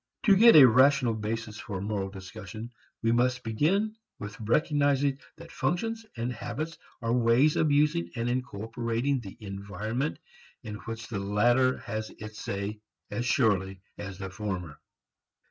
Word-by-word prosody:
To 200 -4 +6
get 230 +4 +8
a 140 -4 +11
rational 130 0 +4
basis 110 0 -4
for 100 -4 -5
moral 100 -1 -2
discussion 100 +3 -9 0.3
we 115 - +3
must 125 +1 +2
begin 185 - +1 0.2
with 105 +2 -8
recognizing 140 +3 +2 0.2
that 165 - -12
functions 225 +4 -2
and 120 +2 -2
habits 130 +8 -5 0.2
are 115 +1 +1
ways 125 +5 +4
of 155 -2 +2
using 145 - +2
and 115 +1 -1
incorporating 120 +2 -1
the 100 -5 -10
environment 105 - -3 0.5
in 105 -2 -6
which 115 -1 -5
the 110 -3 -3
latter 120 +6 +3
has 110 +1 -5
its 110 0 -9
say 100 +2 -4 0.3
as 120 0 -2
surely 95 -7 +1 0.2
as 100 -2 -6
the 95 -1 -6
former. 95 -7 -5
115 Hz, 145 wpm, -28 LUFS, 105-135 Hz, 0.5 s, a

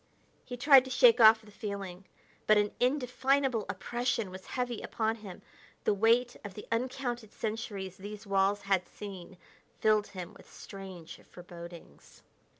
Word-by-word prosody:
He 245 - -7
tried 270 +1 +7
to - - -7
shake 250 -2 +6
off 220 0 +8
the 210 - -16
feeling, 200 -3 -6 0.4
but 215 - +6
an 210 0 +2
indefinable 260 -2 +1
oppression 235 0 -2
was 185 0 -10
heavy 245 -2 -2
upon 220 0 -1
him; 200 -5 -11 0.4
the - - +2
weight 230 +4 +3
of 200 -3 -8
the 210 - -8
uncounted 240 -2 -2
centuries 205 -4 -5
these 210 +2 -9
walls 195 +1 +2
had 195 -2 +1
seen 190 -3 -9 0.4
filled 215 -1 +3
him 185 0 -8
with - - -17
strange 190 -4 -10
forebodings. 170 - -12
210 Hz, 145 wpm, -31 LUFS, 195-240 Hz, 0.4 s, off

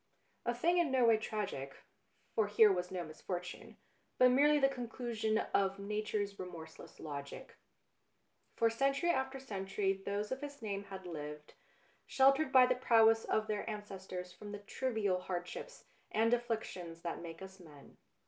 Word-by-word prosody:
A 240 - +1
thing 345 +8 +3
in 340 -4 +3
no 260 -2 +3
way 225 -1 +6
tragic, 205 -11 -4 0.6
for 220 -2 +2
here 210 0 +6
was 180 -1 -1
no 180 -2 -3
misfortune, 175 +3 -6 0.4
but 255 0 +6
merely 295 +3 +5
the 270 -2 +5
conclusion 235 -4 -2 0.2
of 195 0 +2
Nature's 205 0 -2
remorseless 170 -3 -9
logic. 140 -2 -7 1.0
For 230 - +3
century 275 +8 +2
after 265 -2 -1
century 195 -5 -1
those 200 +2 -3
of 260 +2 -3
his 285 -1 -7
name 200 -3 -4
had 190 -1 -8
lived, 150 -3 -7 0.5
sheltered 275 +2 +4
by 255 -1 +8
the 255 - +3
prowess 225 -3 +4
of 215 - +1
their 215 +1 -3
ancestors 190 -4 -6
from 205 +2 -9
the - - -4
trivial 205 -4 -1
hardships 180 - -6 0.2
and 225 +2 +2
afflictions 220 -8 -3
that 170 -1 -4
make 165 +1 -8
us 190 0 -11
men. 150 -5 -15
210 Hz, 150 wpm, -35 LUFS, 185-245 Hz, 1.0 s, by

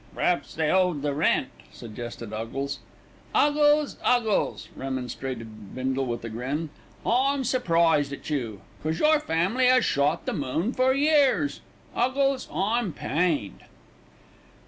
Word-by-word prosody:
"P'r'aps 170 -6 0
they 155 -1 +1
owed 180 -6 +2
the 145 -1 0
rent," 140 -3 +1 0.2
suggested 120 -1 -8
Huggles. 115 +6 -4 0.6
"'Uggles, 295 0 +3
'Uggles," 235 -4 +1
remonstrated 125 -5 -6
Bindle 130 +1 -1
with 120 -1 -4
a - - -4
grin, 135 +8 -3 0.3
"I'm 270 +3 +2
surprised 165 - +2
at 140 - -8
you. 120 -9 -3 0.2
'Cos 160 +1 -1
your 305 0 +4
family 210 - +1
'as 255 0 +5
shot 145 +4 +1
the - - -2
moon 160 - -1
for 255 0 +3
years 290 0 +2 0.3
'Uggles, 270 +2 +1
I'm 210 -1 0
pained." 145 - -1
160 Hz, 125 wpm, -26 LUFS, -, 0.6 s, as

